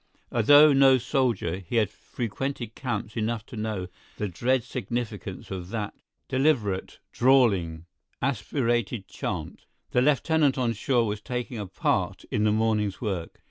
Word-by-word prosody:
Although 145 +6 +7
no 135 -1 +6
soldier, 120 - 0
he 95 +4 -6
had 105 -3 +2
frequented 120 +1 -4
camps 120 -4 -4
enough 115 -1 -2
to - - -11
know 105 -4 -3 0.3
the 105 - -1
dread 120 +7 +1
significance 110 -8 -5
of 90 -2 -5
that 105 -2 -3 0.3
deliberate, 130 -9 +1
drawling, 100 -11 +3 0.3
aspirated 120 -4 -1
chant; - - -5 0.3
the 125 - +3
lieutenant 150 +1 +3
on 120 -3 +1
shore 120 -1 +1
was 105 -1 -3
taking 125 0 -4
a 100 - -4
part 90 - -1
in 105 - +1
the 105 - +4
morning's 105 -2 +1
work. 95 -7 -4
115 Hz, 140 wpm, -26 LUFS, 105-130 Hz, 0.3 s, Although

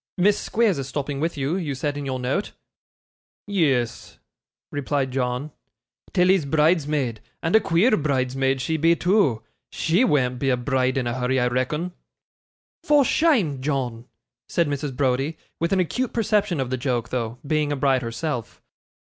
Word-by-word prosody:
Miss 200 +3 +3
Squeers 215 -9 +1
is 135 - -4
stopping 140 0 -3
with 165 +1 -2
you, 140 +4 -1
you 155 -7 -3
said 145 +2 -2
in 145 -1 -4
your 130 -1 -2
note.' 130 +11 -2 0.9
'Yes,' 145 - 0 0.5
replied 140 -1 -1
John, 125 +3 -2 0.6
'Tilly's 180 -3 +3
bridesmaid; 150 -6 +1 0.2
and 165 +5 +2
a - - +8
queer 210 +4 +3
bridesmaid 135 -3 0
she 160 +3 -1
be, 165 +2 +4
too. 175 - +2 0.3
She 170 +9 +2
wean't 125 - +1
be 135 - 0
a 125 - +2
bride 130 +1 0
in 130 - 0
a 120 - -1
hurry, 130 +1 0
I 125 0 +2
reckon.' 150 +8 -1 0.9
'For 295 -2 +4
shame, 220 - +2
John,' 130 -5 -2 0.4
said 170 -2 +1
Mrs. 145 -2 -3
Browdie; 135 +3 0 0.2
with 170 +1 0
an 195 - +3
acute 245 +8 -1
perception 210 -6 +1
of 130 -2 -2
the 130 - 0
joke 120 -3 -1
though, 120 -2 -3
being 150 0 0
a - - +1
bride 135 -1 +2
herself. 120 0 -4
145 Hz, 160 wpm, -23 LUFS, 130-170 Hz, 0.9 s, a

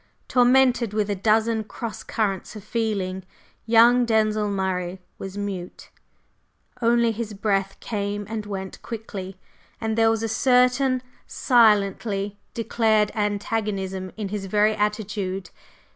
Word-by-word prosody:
Tormented 250 -3 +4
with 210 -1 0
a - - 0
dozen 220 +3 +2
cross 220 +1 -6
currents 205 -3 -2
of 210 - -9
feeling, 205 -5 -2 0.5
young 235 +2 +6
Denzil 215 -2 +1
Murray 190 -2 -2 0.2
was 195 +1 -7
mute; 195 -3 -6 0.9
only 235 0 +3
his 220 -1 -5
breath 195 -1 -1
came 205 -1 -3
and 215 -1 -5
went 190 -2 -6
quickly, 195 -4 -7 0.4
and 220 -1 -1
there 225 0 +4
was 225 0 0
a - - 0
certain 250 +2 +3 0.2
silently 205 -3 +2 0.2
declared 220 -2 +2
antagonism 205 -3 -2
in 210 -3 -3
his 200 -1 -4
very 210 +2 +3
attitude. 205 -3 -2
210 Hz, 120 wpm, -24 LUFS, 195-225 Hz, 0.9 s, young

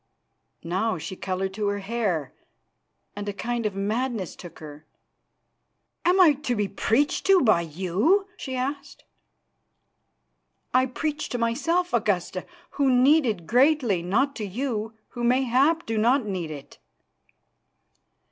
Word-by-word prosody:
Now 190 +7 -1
she 165 +4 -6
coloured 190 +1 -3
to 210 0 -2
her 205 0 0
hair, 195 - -2 0.8
and 205 0 -4
a - - -3
kind 235 +2 -2
of 200 - -6
madness 215 0 -2
took 175 -2 -11
her. 150 0 -11 1.2
"Am 360 +2 +4
I 340 -5 +7
to 250 -5 -1
be 205 -2 0
preached 225 +8 0
to 390 -1 +6
by 215 - +4
you?" 190 - +1
she 265 -10 -6
asked. 275 +3 -4 1.7
"I 255 +1 +4
preach 300 +4 -3
to 245 - -2
myself, 330 +10 0
Augusta, 190 -5 0 0.2
who 275 -2 +2
need 265 +3 +5
it 205 -7 -2
greatly, 250 - +3
not 245 +11 0
to 220 - -4
you, 220 +1 -3
who 240 - -6
mayhap 260 +6 +2
do 225 -1 -1
not 245 +3 +3
need 185 -5 -3
it." 145 -3 -10
225 Hz, 135 wpm, -25 LUFS, 190-265 Hz, 1.7 s, I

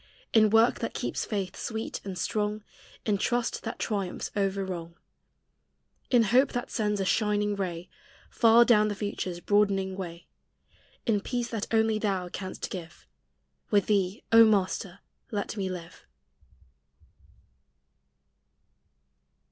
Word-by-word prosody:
In 215 -1 +6
work 225 +3 +4
that - - -4
keeps - - -2
faith 195 -4 -3
sweet 220 -1 -4
and 190 -2 -6
strong, 210 +1 -1 0.4
In 205 -2 +1
trust 240 +1 0
that 225 - -5
triumphs 200 -4 -3
over 195 -1 0
wrong, 170 -2 -6 1.1
In 245 -3 +5
hope 250 +6 +3
that 245 -1 -3
sends 210 -2 0
a 195 - 0
shining 210 0 +1
ray 180 -3 -4 0.4
Far 230 +1 +6
down 215 -3 +5
the 205 - -2
future's 195 -3 -4
broadening 195 -1 +1
way? 175 -3 -7 0.8
In 210 -4 +2
peace 240 +1 -3
that 220 -3 -4
only 220 -1 +2
thou 190 -4 -1
canst 185 +1 -6
give, 175 -3 -8 0.6
With 205 -3 +3
thee, 200 0 0
O 230 0 +9
Master, 195 -3 +1 0.3
let 210 -2 -3
me 195 -3 -2
live! 175 -2 -8
205 Hz, 125 wpm, -28 LUFS, 190-220 Hz, 1.1 s, O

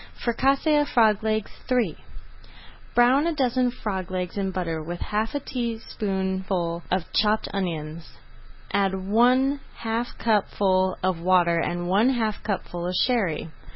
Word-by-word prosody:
FRICASSÉE 275 +5 +2
OF 290 - -2
FROG 220 -3 +4
LEGS 215 -1 -1 0.2
III 250 -2 +2 1.0
Brown 255 +6 +5
a 335 - 0
dozen 255 -2 +2
frog 195 -7 -4
legs 180 -1 -3
in 195 -1 -1
butter 170 -4 -3
with 175 +3 -6
half 215 +4 -2
a - - +1
teaspoonful 190 -8 -2
of 180 -2 -2
chopped 215 0 +2
onions. 165 -4 -4 0.6
Add 195 -1 +2
one 245 +8 +3 0.2
half 230 +1 -3
cupful 190 -4 +1
of 185 -2 +1
water 170 -1 +3
and 175 +1 -2
one 205 +7 +4
half 225 -5 -1
cupful 175 -4 -3
of 180 - -2
Sherry. 185 - 0
200 Hz, 135 wpm, -25 LUFS, 185-240 Hz, 1.0 s, Brown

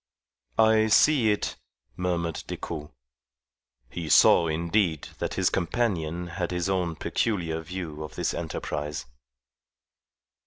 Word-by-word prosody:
"I 110 0 +5
see 120 +1 +5
it," 105 - -2 0.4
murmured 85 -2 -2
Decoud. 75 -3 -5 1.0
He 85 -3 -5
saw, 85 +3 +6
indeed, 85 0 0
that - - -2
his - - +2
companion 90 -4 -1
had 85 0 -3
his 90 0 -1
own 90 -4 0
peculiar 85 -4 -1
view 80 -2 -6
of 75 - -9
this - - -1
enterprise. 75 0 -4
85 Hz, 110 wpm, -27 LUFS, 80-95 Hz, 1.0 s, saw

